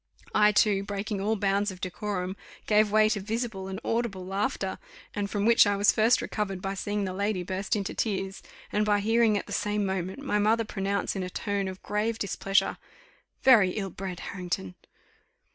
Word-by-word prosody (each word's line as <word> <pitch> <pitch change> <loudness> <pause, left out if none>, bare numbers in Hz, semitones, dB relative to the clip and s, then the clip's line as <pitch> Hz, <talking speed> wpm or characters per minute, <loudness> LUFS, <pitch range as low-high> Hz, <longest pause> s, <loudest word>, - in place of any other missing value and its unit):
I, 210 0 +5
too, 205 -1 +3
breaking 200 0 -3
all 215 +3 +1
bounds 200 0 +1
of 185 -2 -8
decorum, 185 0 -3 0.3
gave 210 0 +4
way 215 0 +5
to 215 -1 0
visible 215 -1 -3
and 190 0 -5
audible 225 -5 -1
laughter; 200 +8 -2 0.3
and 205 -1 -2
from 205 0 -1
which 230 -2 +6
I 205 - +2
was 200 +1 +5
first 225 +3 +3
recovered 195 -3 -3
by 195 +1 -3
seeing 205 +1 -2
the 185 - -3
lady 200 -1 -1
burst 190 +3 -2
into 200 -2 -2
tears, 195 -3 -2 0.3
and 210 - +2
by 205 -1 +2
hearing, 225 0 +3
at - - -4
the - - -7
same 210 0 0
moment, 190 -1 -2
my 270 -7 -1
mother 220 +2 +2
pronounce 200 0 -2
in 190 - -2
a 180 - -3
tone 200 0 -2
of 190 0 -7
grave 215 +2 -1
displeasure, 195 0 0 0.6
"Very 210 -9 +6
ill 195 -3 -3
bred, 185 -1 -6
Harrington!" 175 - -4
205 Hz, 185 wpm, -28 LUFS, 190-215 Hz, 0.6 s, which